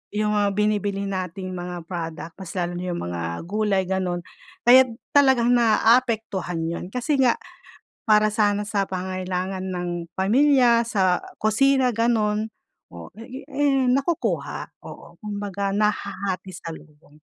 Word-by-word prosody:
Yung 210 0 +1
mga 205 -1 +1
binibili 205 -1 0
nating 185 -1 -4
mga 175 -1 -6
product, 165 -2 -5
mas 185 -3 -8
lalo 175 -2 -2
na 180 - -4
yung 175 - -4
mga 85 -1 -4 0.2
gulay, 200 0 0
ganun. 185 -2 -1 0.4
Kaya 255 +2 +8 0.3
talagang 265 -4 +5
naaapektuhan 225 -7 +2
yun, 170 +1 -4
kasi 275 +4 0
nga 245 -3 +4 0.7
para 215 -1 +5
sana 205 -1 +1
sa 205 -1 -1
pangangailangan 185 0 -3
ng 180 -1 -3 0.3
pamilya, 240 +3 +4
sa 190 -5 +2 0.2
kusina, 260 +4 +3
ganun, 220 -2 +1 0.4
oo, 85 -1 -11 0.4
eh, 270 -2 +2
nakukuha. 275 +6 -1
Oo, - - -12
kumbaga 200 -2 -3
nahahati 200 -3 -2
salubong. 155 -3 -11
205 Hz, 120 wpm, -23 LUFS, 185-230 Hz, 0.7 s, Kaya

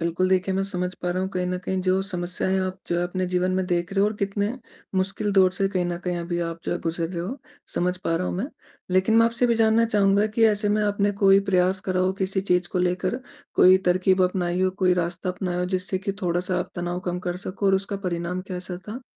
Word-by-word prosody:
बिल्कुल 170 +2 0
देखिए, 190 0 +1
मैं 195 - +1
समझ 180 -2 -3
पा 180 - 0
रहा 185 +1 -1
हूँ 190 - -1
कहीं 180 -1 -2
न 180 0 -2
कहीं 190 0 -1
जो 185 +1 +2
समस्याएँ 185 0 -2
आप 185 0 -3
जो 170 - +1
है - - +1
अपने 185 +1 -2
जीवन 180 0 0
में 185 0 +1
देख 175 0 -1
रहे 195 - +1
हो 200 - +5
और 210 - 0
कितने 200 0 -1 0.5
मुश्किल 195 +2 0
दौर 190 -2 +5
से 195 +1 0
कहीं 185 -2 -1
न 175 0 -2
कहीं 180 -1 -1
अभी 170 0 -3
आप 165 -1 -4
जो - - -1
गुज़र 165 0 -2
रहे 175 -1 -4
हो, 245 +11 -5 0.4
समझ 180 +1 0
पा 180 -3 -2
रहा 180 +2 -1
हूँ - - -2
मैं। 205 +7 -2 0.4
लेक़िन 185 +4 +3
मैं 230 0 +6
आपसे 235 +2 +1
भी 235 - +3
जानना 225 0 +4
चाहूँगा 205 -1 +3
कि 220 +1 +2
ऐसे 210 -1 +1
में 210 +1 +2
आपने 205 0 +1
कोई 195 0 +7
प्रयास 185 +1 +2
करा 185 -1 -1
हो 185 +1 +2
किसी 190 0 -1
चीज़ 180 -2 +1
को 185 - 0
लेकर, 180 +6 0 0.3
कोई 185 +1 +7
तरकीब 185 +1 +3
अपनाई 180 -1 -1
हो, 185 - +3
कोई 185 -1 +2
रास्ता 175 +1 -2
अपनाया 180 -1 -3
हो 180 - 0
जिससे 185 +1 -3
कि 195 +1 -3
थोड़ा-सा 180 +1 0
आप 180 0 -4
तनाव 175 0 -2
कम 180 -1 -3
कर 175 - -2
सको 200 +2 -2
और 195 - +5
उसका 195 +1 -1
परिणाम 175 +1 -2
कैसा 180 0 -5
था? 240 +5 -6
185 Hz, 245 wpm, -24 LUFS, 180-195 Hz, 0.5 s, कोई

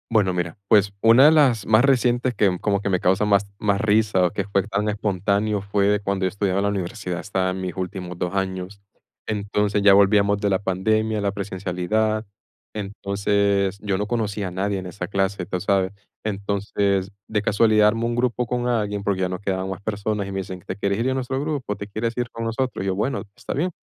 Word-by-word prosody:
Bueno, 105 -5 +2
mira, 90 -2 -3
pues, 100 -2 +4
una 115 +4 +7
de 155 - +8
las 130 -9 +4
más 110 +3 +5
recientes 125 -2 +2
que 95 -5 +2
como 100 -1 0
que 100 - -2
me 90 -2 +1
causa 95 +4 +2
más 100 -1 +3
más 100 -1 +1
risa 105 -3 +3
o 90 - 0
que 100 - -2
fue 100 0 0
tan 105 0 -1
espontáneo, 105 0 0
fue 100 +1 +1
cuando 100 -1 -1
yo - - +2
estudiaba 100 0 -1
en - - 0
la 100 - +2
universidad, 95 -2 -3
estaba 95 -2 -1
en 95 0 -5
mis 90 -2 -4
últimos 90 -1 -5
2 90 +1 -2
años, 95 +1 -3 0.5
entonces, 105 -1 0
ya 100 -1 +7
volvíamos 100 0 +4
de 100 -1 0
la 95 -1 +2
pandemia, 110 +3 0
la 100 -1 0
presencialidad, 100 +2 -1 0.5
entonces, 100 -1 0
yo 100 -2 -1
no 105 - -1
conocía 105 -4 -2
a - - -11
nadie 100 +2 -1
en 95 - -8
esa 95 +3 -6
clase, 95 -2 -1
tú 90 0 -3
sabes, 95 -2 +1 0.3
entonces, 100 -1 -1 0.2
de 105 -1 0
casualidad 105 0 +4
armé 115 +2 -2
un 120 0 -1
grupo 125 0 0
con 125 +1 -1
alguien, 105 -4 -1
porque 100 -2 0
ya 90 - 0
no 90 0 -4
quedaban 95 -1 -2
más 95 0 -6
personas, 105 -1 -2
y - - -6
me 95 - -2
dicen: 95 -1 -6
"¿Te - - -4
quieres 100 -1 -1
ir 120 +3 +1
a - - 0
nuestro 130 0 -2
grupo? 140 -7 -2
¿Te 100 - -6
quieres 110 +3 -2
ir 120 -1 -1
con 115 - -6
nosotros?", 115 -1 -2
y - - -3
yo: 95 - 0
"Bueno, 110 +7 -1
está - - -6
bien", 175 +7 -1
100 Hz, 215 wpm, -23 LUFS, 95-110 Hz, 0.5 s, de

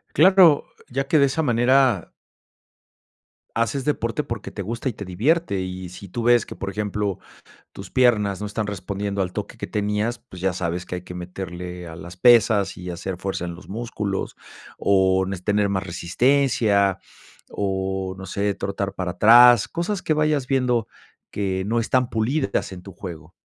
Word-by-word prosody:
Claro, 180 -2 +6 0.2
ya 135 +2 -2
que 155 - +4
de 140 - +5
esa 145 +4 -1
manera 125 - +2 1.4
haces 115 +4 0
deporte 135 -1 -1
porque 115 -3 -6
te 100 - -6
gusta 115 +6 -3
y - - -2
te 100 - -8
divierte, 105 - 0
y 95 0 -5
si 95 +2 -11
tú 115 +6 -4
ves 120 -1 +4
que, - - -8
por 100 - -5
ejemplo, 105 -1 -2 0.5
tus - - -10
piernas 105 -6 +2
no 105 - -4
están 105 +1 -3
respondiendo 100 0 -3
al 90 -1 -2
toque - - -5
que - - -5
tenías, 105 +3 -1
pues, 90 -6 -13
ya 95 -1 +1
sabes 90 0 -3
que 90 - -5
hay 90 - -5
que 90 - -9
meterle 90 0 -7
a 80 - -9
las 85 +1 -10
pesas 110 -2 +4
y 90 0 -7
hacer 90 +1 -5
fuerza 95 -1 -3
en 85 -1 -5
los 90 - -14
músculos 105 -2 -4 0.4
o 95 -1 +3
nes 95 -2 -5
tener 105 0 +1
más 95 -1 -1
resistencia 100 +1 +2 0.5
o 95 -1 -2
no 95 - -8
sé, 100 +2 -1
trotar 100 0 -3
para 90 -2 -3
atrás, 120 +4 +7
cosas 175 +3 -3
que 155 - +1
vayas 150 -3 +1
viendo 125 -4 +1 0.4
que 95 -2 -2
no 115 +3 +1
están 125 +2 +1
pulidas 115 0 -1
en 90 - -9
tu 100 - -11
juego. 85 -3 -9
100 Hz, 175 wpm, -23 LUFS, 95-120 Hz, 1.4 s, atrás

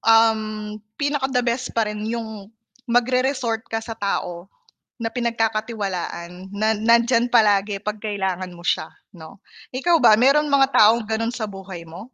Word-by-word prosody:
um, 225 -1 +5 0.6
pinaka 285 -2 -1
the 250 -2 0
best 245 0 -2
pa 225 - +3
rin 210 0 -5
'yung 220 -3 -5 0.4
magre 245 +2 +2
resort 255 -4 -1
ka 225 - -2
sa 225 - -6
tao 195 -4 -3 0.5
na 225 - -1
pinagkakatiwalaan, 215 -6 -3
na 215 +1 +1
nandiyan 235 +2 +3
palagi 205 -3 +3
'pag 210 0 -4
kailangan 190 -4 -3
mo 170 - -13
siya - - -1 0.2
'no? 160 +3 -13 0.3
Ikaw 335 +7 +2
ba, 240 -5 +6
meron 285 +4 +4
mga 270 -1 +5
taong 220 +1 +5
gano'n 225 +1 -1
sa 220 -3 -4
buhay 190 -4 -9
mo? 165 - -10
220 Hz, 155 wpm, -22 LUFS, 200-240 Hz, 0.6 s, ba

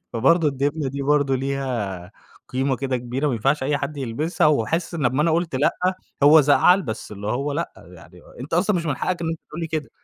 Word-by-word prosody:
فبرضه 150 +8 +3
الدبلة 140 +1 -1
دي 140 +1 -4
برضه 140 -1 +2
ليها 125 -10 -3 0.4
قيمة 130 +1 0
كده 130 0 -2
كبيرة 125 +4 -3
ما - - 0
ينفعش 135 +7 +1
أي 140 +1 0
حد 145 +1 -4
يلبسها، 140 +7 0
وحاسس 155 +5 0
إن 165 - -4
لما 130 +4 +1
أنا 165 - +2
قُلت 165 -1 0
لأ، 135 +3 +2 0.5
هو 150 +2 +8
زعل 165 +6 +4
بس 110 -6 -6
اللي 105 0 -7
هو 135 +7 -1
لأ 165 +4 -3
يعني 85 0 -15 0.2
أنت 145 +6 -4
أصلًا 190 +3 +2
مش 165 -1 -3
من 145 -4 -1
حقك 175 +6 -2
إن 165 - -1
أنت 165 -1 -4
تقول 155 - -6
لي 165 - -2
كده! 155 -2 -4
140 Hz, 215 wpm, -22 LUFS, 125-155 Hz, 0.5 s, هو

